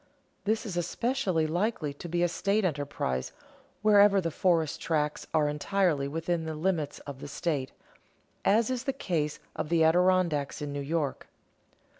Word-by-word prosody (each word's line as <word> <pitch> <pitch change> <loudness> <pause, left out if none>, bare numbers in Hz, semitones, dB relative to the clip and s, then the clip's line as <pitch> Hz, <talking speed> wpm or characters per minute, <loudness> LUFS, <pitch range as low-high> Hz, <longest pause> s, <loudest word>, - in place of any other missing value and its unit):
This 220 +3 0
is 190 -5 -4
especially 180 -2 0
likely 170 -2 -1
to 170 +4 -9
be 175 +1 +1
a - - +4
state 200 +4 0
enterprise 100 - -2 0.5
wherever 205 -1 +6
the 165 -3 -2
forest 165 -2 +1
tracts 150 -2 -1
are 155 -2 +3
entirely 150 -1 +1
within 165 +2 -2
the 160 -1 -4
limits 155 -3 -1
of 140 -2 -8
the - - -7
state, 145 -2 -2 0.7
as 225 +4 +3
is 255 0 -3
the 270 - 0
case 160 - -1 0.2
of - - -3
the 165 -1 +3
Adirondacks 170 -4 +3
in 145 -2 -4
New 145 - -3
York. 150 0 -2
165 Hz, 155 wpm, -29 LUFS, 150-190 Hz, 0.7 s, wherever